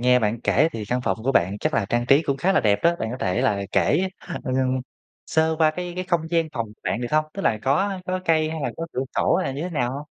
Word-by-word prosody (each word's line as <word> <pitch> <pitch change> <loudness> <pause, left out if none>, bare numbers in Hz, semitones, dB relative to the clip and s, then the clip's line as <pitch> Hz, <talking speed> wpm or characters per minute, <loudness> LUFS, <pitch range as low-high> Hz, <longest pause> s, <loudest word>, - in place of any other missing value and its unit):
nghe 125 +1 +5
bạn 110 0 -1
kể 155 +6 +3
thì 110 - -5
căn 125 +1 0
phòng 95 -2 -1
của 135 - +2
bạn 95 -1 +2
chắc 155 +6 -1
là 110 - +2
trang 120 +2 0
trí 140 +4 +5
cũng 140 -3 -1
khá 185 +7 +1
là - - +3
đẹp 100 -2 +3
đó, 170 +1 +3
bạn 110 - -3
có 125 - -4
thể 90 0 0
là 100 -1 +1
kể, 180 +6 +2 0.4
ừm, 130 0 0 0.5
sơ 160 0 +2
qua 160 -1 +5
cái 175 +2 -5
cái 185 +1 -3
không 170 -3 0
gian 165 -2 +1
phòng 115 -1 -2 0.2
bạn 115 - -1
được 120 - -2
không? 155 0 +3
Tức 195 - -4
là 110 - +2
có 190 +8 +1
có 185 0 -1
cây 155 -1 +2
hay 160 -1 -4
là - - -1
có 165 - -4
cửa 130 - -1
sổ - - +3
hay 185 - -1
là - - -3
như 145 - -4
thế 180 - -4
nào 125 -6 -1
hông? 145 +2 -6
140 Hz, 290 wpm, -23 LUFS, 120-165 Hz, 0.5 s, nghe